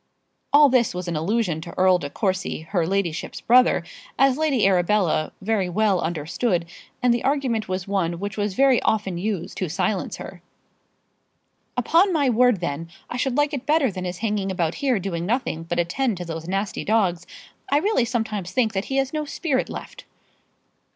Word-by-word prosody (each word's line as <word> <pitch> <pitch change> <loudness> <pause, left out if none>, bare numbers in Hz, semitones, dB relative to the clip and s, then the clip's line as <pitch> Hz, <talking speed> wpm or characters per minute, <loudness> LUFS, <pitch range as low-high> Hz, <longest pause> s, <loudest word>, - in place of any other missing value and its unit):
All 290 +1 +7
this 250 -7 +2
was 180 0 -4
an 170 - -2
allusion 175 0 0
to 170 - -10
Earl 185 -1 +4
de 145 - -5
Courcy, 185 0 -2
her 175 -5 0
ladyship's 180 -3 -2
brother, 250 +2 +4 0.3
as 270 -1 +4
Lady 285 -7 +1
Arabella 180 -3 +2
very 200 -3 0
well 200 0 +2
understood; 170 +4 -1 0.4
and 245 -1 +5
the 240 - -1
argument 260 -7 0
was 185 0 -3
one 180 -4 -1
which 200 +2 -4
was 205 -2 -2
very 270 -1 +4
often 195 -5 0
used 195 -3 -3
to 185 - -2
silence 190 +4 -1
her. - - -9 1.4
"Upon 335 - +3
my 285 -6 +2
word, 245 -4 +3
then, 165 0 -3 0.2
I 245 - -3
should 265 +1 -1
like 290 +1 +2
it 275 -2 -4
better 295 -5 +3
than 185 -1 -5
his 180 0 -4
hanging 205 -2 -1
about 170 -3 -1
here 265 -4 +2
doing 175 -3 -3
nothing 220 -8 -1
but 175 +1 -3
attend 195 +6 0
to 180 - -5
those 165 0 -6
nasty 195 +2 -2
dogs. 185 -6 +1 0.4
I 285 - +5
really 350 - +2
sometimes 220 -6 -3
think 230 -4 +1
that 195 +1 -2
he 270 - -2
has 270 +1 0
no 305 -1 -2
spirit 285 -3 -1
left." - - -8
205 Hz, 180 wpm, -23 LUFS, 180-250 Hz, 1.4 s, All